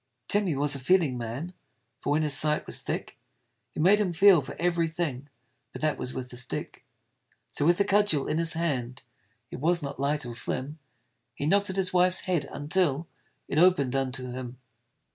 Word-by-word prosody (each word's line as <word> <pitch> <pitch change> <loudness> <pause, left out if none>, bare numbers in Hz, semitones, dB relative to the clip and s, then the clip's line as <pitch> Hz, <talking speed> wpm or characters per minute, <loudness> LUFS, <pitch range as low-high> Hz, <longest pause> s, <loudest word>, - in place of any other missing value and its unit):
Tim 205 -1 +2
he 160 - -1
was 145 +1 +2
a 140 - +2
feeling 150 -1 +2
man: 125 +9 -5 0.5
For - - -5
when 150 +2 +2
his 150 -2 +3
sight 150 +1 +2
was - - -3
thick, - - -6 0.6
It 155 - -1
made 200 +4 +5
him 190 -4 0
feel 190 -1 +6
for 135 - -9
every 170 -1 0
thing 145 -5 -4 0.4
But - - -8
that 155 - 0
was 125 - -3
with 125 -1 -7
a - - -6
stick. 125 - -4 0.7
So 145 - 0
with 175 +2 +3
a - - +5
cudgel 200 -8 +2
in 155 - -1
his 165 -1 +1
hand 130 -7 -3 0.5
It - - -7
was 170 +3 +1
not 140 -1 -6
light 145 0 0
or 120 - -6
slim 135 +5 -2 0.6
He 145 - -4
knocked 200 +5 +2
at 190 - -3
his 190 -2 +1
wife's 180 0 +4
head 170 -7 -2
until 155 0 0 0.4
It 150 - 0
open'd 160 -8 +3
unto 130 -1 -2
him. 125 0 -7
155 Hz, 195 wpm, -27 LUFS, 135-175 Hz, 0.7 s, feel